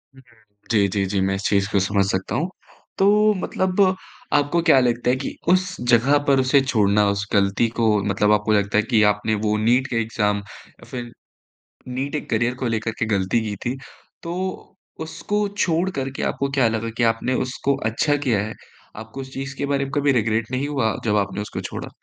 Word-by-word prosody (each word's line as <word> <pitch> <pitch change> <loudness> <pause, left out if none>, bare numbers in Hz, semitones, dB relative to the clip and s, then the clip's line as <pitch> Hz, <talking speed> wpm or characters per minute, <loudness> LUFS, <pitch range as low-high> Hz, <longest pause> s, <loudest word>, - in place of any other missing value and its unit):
हुँ, 135 - -16
हुँ। 105 -3 -28 0.2
जी, 105 -3 +4
जी, 100 0 -1
जी 95 +1 -1
मैं 95 +1 +1
इस 95 - -5
चीज़ 100 -1 +2
को 100 - +3
समझ 100 +1 +1
सकता 95 +3 -2
हूँ। 165 +8 -1 0.5
तो 210 +2 +4
मतलब 185 +1 0 0.5
आपको 145 +4 +2
क्या 155 -5 +6
लगता 120 -1 +1
है 125 - +3
कि 135 - -5
उस 185 0 +2
जगह 130 +4 +5
पर 135 -1 +4
उसे 130 +1 +4
छोड़ना 105 -5 +2
उस 100 0 -1
गलती 100 +3 +2
को 115 -1 +2 0.2
मतलब 105 +1 +1
आपको 105 +1 +2
लगता 100 0 +1
है 105 - +4
कि 115 -1 +2
आपने 110 +1 -1
वो 105 0 +2
नीट 120 +5 +2
के 125 - -4
एग्ज़ाम 105 -2 0
या 100 0 -15
फ़िर 120 -2 -6 0.8
नीट 130 +4 -3
एक 150 - -5
करियर 120 +2 +1
को 125 -1 -3
लेकर 110 0 -1
के 115 - +1
गलती 95 +4 +1
की 105 - -4
थी। 120 +2 -1 0.5
तो 170 +1 -4 0.7
उसको 205 +5 -2
छोड़ 175 0 +1
कर 135 -5 -3
के - - -3
आपको 140 0 -1
क्या 135 -4 +3
लगा 115 0 -2
कि 120 - +1
आपने 120 +3 -3
उसको 135 +2 -1 0.2
अच्छा 145 +5 +1
किया 125 -7 0
है? 110 - -6 0.4
आपको 110 +5 -8
उस 130 0 -10
चीज़ 135 0 -5
के 140 - -1
बारे 140 -1 0
में 135 - -8
कभी 145 -1 +3
रिग्रेट 110 -1 0
नहीं 130 +3 -1
हुआ 130 -7 0
जब 105 -1 +2
आपने 100 0 -1
उसको 105 - -5
छोड़ा? - - -6
120 Hz, 205 wpm, -22 LUFS, 105-140 Hz, 0.8 s, क्या